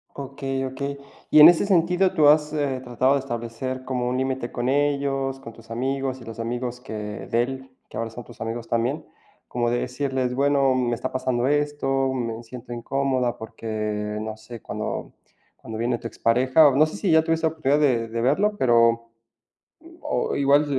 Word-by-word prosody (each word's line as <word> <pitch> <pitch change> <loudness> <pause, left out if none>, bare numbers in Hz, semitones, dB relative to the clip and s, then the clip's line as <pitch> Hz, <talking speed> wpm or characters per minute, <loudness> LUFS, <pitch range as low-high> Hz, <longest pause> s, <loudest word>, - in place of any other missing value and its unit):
Okey, 135 -1 -4
okey. 140 +2 -4 0.3
Y 155 - +6
en 155 - +12
ese 175 +2 +3
sentido, 180 0 +2
¿tú 150 -2 +5
has, 150 0 +5
eh, 140 -4 -1
tratado 130 +2 +2
de 140 - +2
establecer 130 0 -5
como 125 -2 -2
un 125 - -1
límite 130 -2 -2
con 120 0 -2
ellos, 140 -1 0
con 115 -3 -10
tus 115 0 -17
amigos 130 +2 -2
y - - -11
los 115 0 -9
amigos 120 +1 -3
que 125 - -9
de 110 +2 -2
él, 130 +1 -7 0.2
que - - -8
ahora 115 - -2
son 120 +2 -9
tus 115 0 -15
amigos 115 +1 -4
también? 120 +6 -1 0.4
Como 120 -1 -1
de 120 - +1
decirles: 130 0 -2
"Bueno, 140 0 +3
me 125 -2 0
está 130 - -4
pasando 130 -1 0
esto, 145 -2 +1
me 115 -3 -3
siento 120 +1 -9
incómoda 125 0 -1
porque, 105 -1 -4
no 110 0 -5
sé, 115 +1 -11
cuando - - -5 0.4
cuando 110 -1 -8
viene 120 +2 0
tu - - -5
expareja", 130 +7 +4
o 135 - +2
no 150 +3 +6
sé 155 - -7
si 195 - 0
ya 160 0 +5
tuviste 165 0 0
oportunidad 155 -3 +1
de 125 -6 +2
de 115 +1 -3
verlo, 195 - +2
pero, 115 - +3 0.9
o 300 - -1
igual, 140 +1 +4
130 Hz, 185 wpm, -24 LUFS, 115-140 Hz, 0.9 s, en